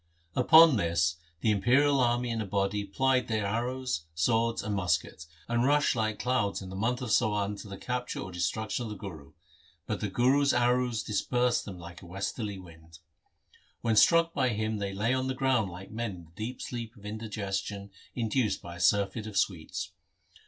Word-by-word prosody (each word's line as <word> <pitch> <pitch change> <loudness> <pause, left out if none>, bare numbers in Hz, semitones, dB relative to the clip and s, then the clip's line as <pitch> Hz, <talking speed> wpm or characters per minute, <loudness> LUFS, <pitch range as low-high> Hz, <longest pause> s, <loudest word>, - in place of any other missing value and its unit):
Upon 160 +2 +7
this 85 -2 +1 0.2
the 110 - +3
Imperial 130 +7 +3
army 120 -1 +1
in 115 -1 -1
a - - -3
body 100 +1 0
plied 130 +5 +1
their 110 -3 -1
arrows, 120 -4 -2
swords, 115 +7 +1
and 105 0 -2
muskets, 80 -4 -1 0.2
and 120 0 +1
rushed 145 +1 +3
like 110 -2 -1
clouds 125 -6 0
in 95 - -8
the - - -6
month 120 +6 -1
of 115 - -3
Sawan 105 -1 +2
to 105 - -9
the 100 -1 -7
capture 125 +2 -3
or 95 - -6
destruction 110 +7 -2
of - - -5
the 105 - -5
Guru, 80 -8 -9 0.5
but - - -3
the 105 - -2
Guru's 135 +7 +3
arrows 120 -1 +2
dispersed 120 +3 0
them 95 -3 -7
like 85 +2 -10
a 90 - -12
westerly 100 +3 -4
wind. 80 -3 -14 0.8
When 115 -2 +1
struck 165 +9 +5
by 130 - +2
him 110 -1 -1
they 100 -1 -2
lay 110 +5 +1
on 130 0 0
the 130 - -2
ground 130 -6 +1
like 90 +2 -10
men 110 -3 -3
in 85 -2 -12
the 80 - -22
deep 110 +8 -6
sleep 120 -1 -6
of 105 - -15
indigestion 100 -2 -4 0.2
induced 115 -1 0
by 85 0 -9
a - - -11
surfeit 100 +4 +2
of 105 -2 -5
sweets. 90 -5 -1
110 Hz, 190 wpm, -29 LUFS, 95-125 Hz, 0.8 s, Upon